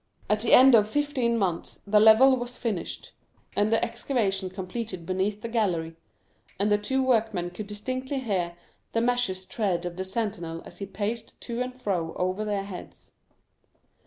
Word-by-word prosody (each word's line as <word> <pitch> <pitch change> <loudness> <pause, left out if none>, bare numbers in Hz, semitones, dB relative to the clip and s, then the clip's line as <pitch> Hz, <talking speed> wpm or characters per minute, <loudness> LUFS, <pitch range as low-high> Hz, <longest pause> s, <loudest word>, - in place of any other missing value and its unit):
At 210 - +3
the 225 - +1
end 260 +1 +9
of 215 -2 +5
fifteen 260 -3 +1
months 185 -6 -2
the 210 +1 +4
level 220 +5 +7
was 245 0 -6
finished, 215 -8 -4 0.4
and 210 +1 +2
the 225 - +3
excavation 225 -5 -1
completed 185 0 -5
beneath 190 +3 -1
the - - -2
gallery, 180 -8 0 0.6
and 205 +2 +1
the 205 - +4
two 265 +6 0
workmen 220 -8 +1
could 205 +3 -7
distinctly 255 +6 -4
hear 190 -9 -1 0.4
the 230 - +2
measured 235 -6 0
tread 185 -6 -1
of 175 0 -5
the 190 - -2
sentinel 190 -5 -3
as - - -12
he 200 - -4
paced 220 +3 -4
to 235 0 -4
and 250 0 -4
fro 175 -8 -2
over 185 +3 -1
their 205 -2 -1
heads. 195 -2 -10
210 Hz, 165 wpm, -27 LUFS, 185-235 Hz, 0.6 s, end